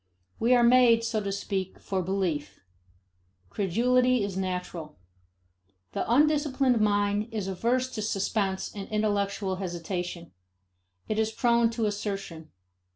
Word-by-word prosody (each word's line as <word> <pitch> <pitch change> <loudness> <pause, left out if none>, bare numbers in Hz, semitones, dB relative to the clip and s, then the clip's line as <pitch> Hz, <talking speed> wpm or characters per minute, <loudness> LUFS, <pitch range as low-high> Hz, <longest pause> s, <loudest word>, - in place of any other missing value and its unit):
We 245 +2 +4
are 240 - +4
made, 235 -1 +5
so 230 -2 -1
to 200 -1 -3
speak, 195 -1 -3
for 190 -1 -2
belief; 180 -5 -2 0.9
credulity 245 - +2
is 200 -2 -3
natural. 180 -4 -4 0.9
The - - -2
undisciplined 275 -3 +3
mind 205 0 +1
is 210 -4 -3
averse 235 +7 0
to 215 - -4
suspense 200 -2 -1
and 200 -2 -7
intellectual 200 -2 -1
hesitation; 175 -1 -5 0.8
it 215 - -1
is 220 0 +1
prone 235 0 +3
to 225 - +1
assertion. 195 -6 -4
205 Hz, 120 wpm, -27 LUFS, 190-235 Hz, 0.9 s, made